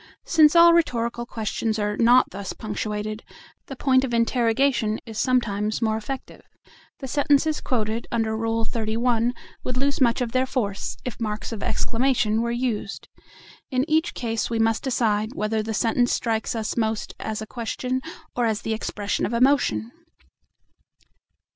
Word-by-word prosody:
Still 315 -2 +6
all 340 0 +8
rhetorical 240 -7 0
questions 220 0 -2
are 210 -1 -1
not 240 +3 +5
thus 195 0 -5
punctuated; 215 0 -4 0.4
the 270 - -7
point 260 0 +3
of 245 -3 -1
interrogation 230 -1 +2
is 220 -2 -6
sometimes 215 -5 +1
more 220 -2 +1
effective. 240 +5 -6 0.6
The 270 - -7
sentences 290 +2 +2
quoted 225 -2 -1
under 225 -2 0
Rule 225 0 -1
XXXI. 230 +1 0 0.3
would 255 0 -3
lose 280 +2 0
much 235 -1 +4
of 245 -2 -2
their 255 +1 +1
force 205 -7 -2
if 250 - -5
marks 215 -1 -3
of 220 -3 -5
exclamation 230 -3 +1
were 235 - -1
used. 235 -4 -3 0.6
In 260 +2 0
each 315 +1 +1
case 225 -2 -2
we 230 - -1
must 225 0 +2
decide 225 -2 0
whether 215 +1 0
the 220 +1 -4
sentence 235 +3 +2
strikes 225 0 -1
us 220 -2 -2
most 220 -2 -1
as 220 -1 -3
a 220 - -5
question 250 +3 -3 0.3
or 245 -1 +1
as 215 -2 -1
the 225 - -1
expression 210 -2 -2
of 235 - -5
emotion. 235 - +2
230 Hz, 155 wpm, -24 LUFS, 220-255 Hz, 0.6 s, all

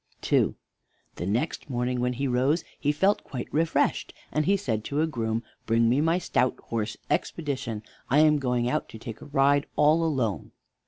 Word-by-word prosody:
II - - +3 0.6
The 85 - -3
next 120 +10 -1
morning 125 0 -1
when 125 0 0
he 135 +3 -2
rose 135 +6 +2 0.2
he 145 - +2
felt 190 +7 +2
quite 125 -4 -6
refreshed, 160 +2 +1 0.2
and 155 +3 0
he 200 +1 +4
said 110 - -2
to 145 +2 0
a - - +3
groom: 115 -6 -2 0.2
"Bring 115 +1 +3
me 130 +4 +3
my 165 +2 +3
stout 130 -7 0
horse, 115 -1 -3
Expedition; 140 -8 -2 0.3
I 135 - +3
am 150 -1 +5
going 125 -3 0
out 150 +5 -1
to - - -9
take 115 0 -8
a - - -9
ride 140 0 +3
all 155 +3 +4
alone." 130 - -1
135 Hz, 180 wpm, -27 LUFS, 120-150 Hz, 0.6 s, am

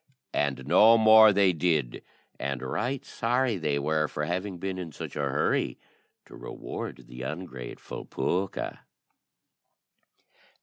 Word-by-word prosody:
And 70 -2 -1
no 110 +10 +6
more 110 -1 +8
they 100 -2 +4
did, 80 -7 0 0.4
and 70 -2 -3
right 130 +2 -2
sorry 120 -1 0
they 75 -4 -1
were 75 +2 0
for 75 - -3
having 90 +3 -3
been 95 +1 -4
in 85 -3 -6
such - - -8
a - - -4
hurry - - 0 0.5
to - - -13
reward 65 - -7
the 60 +1 -9
ungrateful 65 -3 -7
pooka. 95 +2 -2
85 Hz, 125 wpm, -27 LUFS, 70-105 Hz, 0.5 s, more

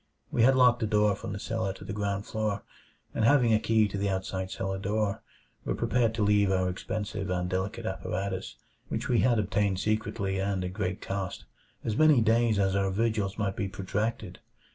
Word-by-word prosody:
We 120 - +1
had 130 +3 +6
locked 125 -2 +5
the 110 - 0
door 105 -1 +3
from - - -6
the 100 - -4
cellar 105 -1 -2
to - - -12
the 100 - -5
ground 100 -1 -2
floor; 110 -2 -2 0.5
and 115 - -1
having 120 -2 +5
a 110 - +4
key 110 -1 +3
to 100 0 -4
the 100 0 0
outside 95 0 -3
cellar 95 0 -3
door, 105 +1 -1 0.4
were - - -1
prepared 115 -2 +1
to 110 - 0
leave 105 -1 +4
our 95 -1 +2
expensive 100 +1 -4
and 90 0 -1
delicate 100 +5 -3
apparatus 95 -1 -3 0.3
which - - -3
we 120 -2 +3
had 120 -2 +3
obtained 100 -2 +1
secretly 105 -2 -1
and 95 -1 -1
at 90 - -5
great 95 0 -3
cost 95 -1 -4 0.4
as 110 - -1
many 155 -1 +6
days 115 -1 +3
as 95 -1 +2
our 100 -1 +1
vigils 105 -1 0
might 100 -3 -1
be 100 -4 -2
protracted. 100 +1 -3
105 Hz, 195 wpm, -28 LUFS, 95-110 Hz, 0.5 s, had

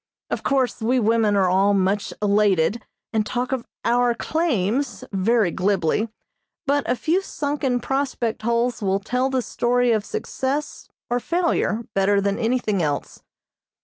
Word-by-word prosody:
Of - - -1
course 260 -3 0
we 250 +3 +2
women 220 -2 +2
are 195 -2 +3
all 195 +3 +3
much 200 +3 0
elated, 205 0 +2 0.3
and 220 -1 +2
talk 245 +5 -3
of 260 -3 -2 0.2
"our 240 0 +3
claims" 275 - -1
very 205 0 +2
glibly, 195 +3 0 0.6
but 285 0 +1
a 245 - +3
few 335 +9 +1
sunken 285 -7 -1
prospect 260 -3 -2
holes 235 +1 0
will 195 -1 +1
tell 250 +6 -1
the 260 -2 0
story 245 +1 +1
of 215 -2 +1
success 290 - -3 0.2
or 245 - +2
failure 335 -8 0
better 195 +1 +3
than 200 0 0
anything 225 -4 0
else. 145 -3 -3
235 Hz, 145 wpm, -23 LUFS, 200-255 Hz, 0.6 s, are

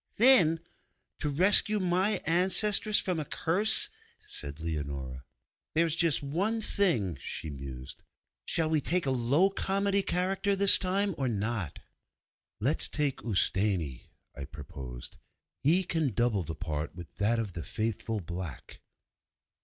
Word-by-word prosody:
'Thin, 210 -10 +6 0.6
to 150 - -1
rescue 200 +7 +4
my 185 +3 +2
ancestress 195 +5 +2
from 180 -3 0
a 155 - -3
curse!' 200 +10 +3 0.3
said 70 +1 -6
Leonora. 70 -5 -5 0.5
'There's 165 -1 +2
just 165 -4 +1
one 180 +11 0
other 225 - -4
thing,' 120 - +1
she 80 - -4
mused. 65 -2 -8 0.5
'Shall 160 - +1
we 155 -1 +1
take 175 +4 -1
a 135 - +1
low 135 +10 +2
comedy 200 +1 +1
character 195 +2 0
this 200 0 +5
time, 195 +1 0
or 135 - 0
not?' 105 - -2 0.8
'Let's 135 +8 +1
take 145 -3 -2
Ustâni,' 95 - 0 0.3
I 70 - -6
proposed, 65 -4 -9 0.4
'he 175 +7 +3
can 160 - -1
double 120 -3 +1
the 80 -1 -6
part 80 -1 -4
with 85 -2 -10
that 110 +3 +1
of 110 -5 -3
the 85 - -6
Faithful 110 0 -3
Black! 85 -5 -8
140 Hz, 135 wpm, -29 LUFS, -, 0.8 s, Thin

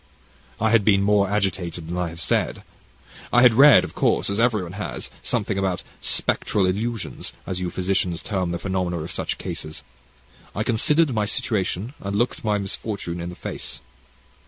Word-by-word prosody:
"I 110 0 +2
had 115 -3 +5
been 100 -1 +4
more 100 -1 +3
agitated 95 -5 -1
than 85 - -4
I 90 -1 -1
have 85 0 -10
said. 75 - 0 0.7
I 120 - +5
had 125 -2 +8
read, 140 +2 +8
of - - -6
course, - - +1
as 100 - -1
everyone 110 -7 +1
has, 105 +3 -5
something 105 -4 -1
about 95 -2 -1 0.2
'spectral 100 -3 +1
illusions,' 110 +3 -3
as 90 -1 -3
you 90 -1 -2
physicians 90 -1 -1
term 95 -4 -1
the 85 - -2
phenomena 90 -2 -2
of 80 +1 -5
such - - -2
cases. 75 0 -6 0.7
I 105 - 0
considered 145 +6 +2
my 105 -2 +1
situation, 105 +2 -1
and 100 0 -4
looked 120 +3 0
my 105 -2 +1
misfortune 95 -3 -4
in 85 - -4
the 90 - -8
face. - - -5
100 Hz, 170 wpm, -23 LUFS, 90-110 Hz, 0.7 s, had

